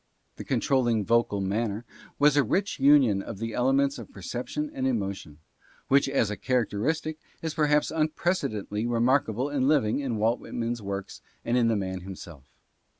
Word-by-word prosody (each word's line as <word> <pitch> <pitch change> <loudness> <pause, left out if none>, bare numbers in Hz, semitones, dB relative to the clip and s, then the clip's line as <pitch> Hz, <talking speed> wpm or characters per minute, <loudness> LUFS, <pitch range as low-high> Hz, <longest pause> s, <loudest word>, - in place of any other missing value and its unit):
The - - -6
controlling 120 -6 +1
vocal 115 -3 +2
manner 105 +3 -2 0.3
was 145 0 +4
a 145 - +5
rich 190 - -1
union 135 -8 +5
of 105 - -7
the 115 +2 -4
elements 135 +3 +2
of 115 - -10
perception 125 +9 -4
and 130 0 -1
emotion, 100 - -3 0.5
which 140 0 +4
as 115 -6 +1
a - - -2
characteristic 130 +7 -1 0.2
is 160 -2 -2
perhaps 150 -1 +2
unprecedentedly 150 - -1
remarkable 120 +1 +1
and 135 -2 0
living 140 -6 +2
in 130 -6 -2
Walt 115 +3 +1
Whitman's 120 0 -4
works 100 -1 -5 0.2
and 120 - +1
in 120 -2 +3
the 115 - +2
man 95 -2 -3
himself. 90 -6 -10
120 Hz, 155 wpm, -27 LUFS, 105-140 Hz, 0.5 s, a